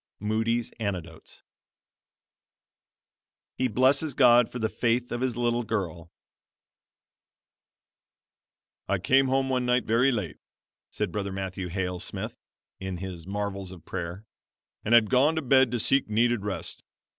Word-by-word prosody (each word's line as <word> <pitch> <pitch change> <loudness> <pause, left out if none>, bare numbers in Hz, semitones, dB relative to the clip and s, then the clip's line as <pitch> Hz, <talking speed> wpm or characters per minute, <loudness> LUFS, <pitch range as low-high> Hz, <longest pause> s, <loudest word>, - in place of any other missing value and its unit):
Moody's 115 +3 0
Anecdotes 90 -7 -6 2.2
HE 130 - +2
BLESSES 135 +6 +2
GOD 120 -3 +5
FOR - - -5
THE 110 -2 0
FAITH 120 +2 0
OF 120 - -3
HIS 130 -3 0
LITTLE 120 0 +1
GIRL 90 -6 -4 2.8
"I - - +2
came 135 +1 +3
home 135 0 +1
one 125 -1 0
night 125 0 +2
very 120 +5 +3
late," 105 - -3 0.5
says - - -2
Brother 100 -2 -3
Matthew 95 -1 -4
Hale 90 0 -3
Smith - - -5 0.4
(in 95 -1 -4
his 90 -2 -7
"Marvels 100 -2 -4
of 85 -4 -12
Prayer"), 90 +3 -5 0.6
"and 115 - +4
had 115 -1 +5
gone 140 +5 +4
to 160 - 0
bed 130 -1 +4
to 120 0 -2
seek 135 +2 +1
needed 115 0 +2
rest. 100 -2 -5
110 Hz, 135 wpm, -27 LUFS, 95-125 Hz, 2.8 s, GOD